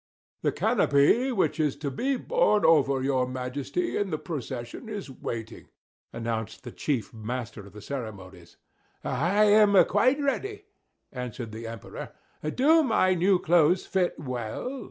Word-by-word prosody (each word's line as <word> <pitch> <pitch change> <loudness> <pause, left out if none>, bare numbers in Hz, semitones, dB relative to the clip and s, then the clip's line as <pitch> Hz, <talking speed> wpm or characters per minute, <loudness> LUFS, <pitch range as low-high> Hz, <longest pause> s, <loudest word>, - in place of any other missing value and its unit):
"The - - +1
canopy 145 - +3
which 160 - 0
is 150 -3 +1
to 145 -1 -4
be 270 - 0
borne 480 - +2
over 140 -4 +4
your 130 -2 +1
Majesty, 130 - -3
in 205 -1 -1
the 155 - -1
procession, 135 - -6
is 205 -9 -6
waiting," 115 -3 -6 0.4
announced 115 -1 -4
the - - -7
chief 135 -2 -2
master 115 -2 -6
of 100 - -16
the 105 -1 -11
ceremonies. 95 -9 -8 0.5
"I 175 +11 +2
am 205 -1 +6
quite 255 +8 +2
ready," 405 +10 -2 0.5
answered 125 -3 -6
the 115 +1 -7
Emperor. 115 -2 -8 0.3
"Do 280 - +4
my 220 -9 +3
new 185 +2 +3
clothes 175 0 +3
fit 185 -2 0
well?" 130 - -4
145 Hz, 140 wpm, -27 LUFS, -, 0.5 s, am